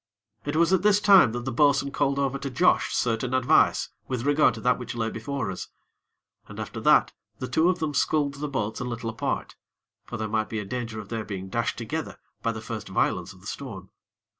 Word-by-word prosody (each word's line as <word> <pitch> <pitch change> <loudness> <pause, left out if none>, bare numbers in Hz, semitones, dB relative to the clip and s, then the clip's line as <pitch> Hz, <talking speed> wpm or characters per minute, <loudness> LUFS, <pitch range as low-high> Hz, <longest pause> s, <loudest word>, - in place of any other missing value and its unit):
It 145 +1 -2
was 170 +3 +3
at 185 - +4
this 205 0 +4
time 195 - +7
that 120 0 -4
the 130 - -2
bo'sun 140 +2 +3
called 140 -1 0
over 140 -1 0
to 140 - -4
Josh 155 +8 +3
certain 120 +2 0
advice 130 -1 +3 0.2
with 125 -1 -3
regard 145 +1 +4
to - - -8
that 125 0 +2
which 125 0 -6
lay 115 -1 -1
before 125 -2 -3
us. 90 - -6 0.8
And - - -10
after - - -5
that - - +4 0.2
the 130 - -4
two 160 +8 +3
of 185 - +1
them 155 -3 -2
sculled 145 0 +1
the 145 +2 -4
boats 110 -6 -3
a - - -3
little 115 -2 -4
apart; 110 - -3 0.5
for - - -5
there 110 0 -2
might 110 0 -1
be 110 - -3
a 105 - -3
danger 115 0 -4
of 105 -1 -9
their 115 -2 -3
being 95 -3 -6
dashed 115 +3 -1
together 155 +7 -4 0.2
by 115 - 0
the 110 -1 -6
first 110 -1 -6
violence 95 - 0
of 95 - -16
the - - -17
storm. 100 -6 -7
125 Hz, 220 wpm, -26 LUFS, 110-145 Hz, 0.8 s, time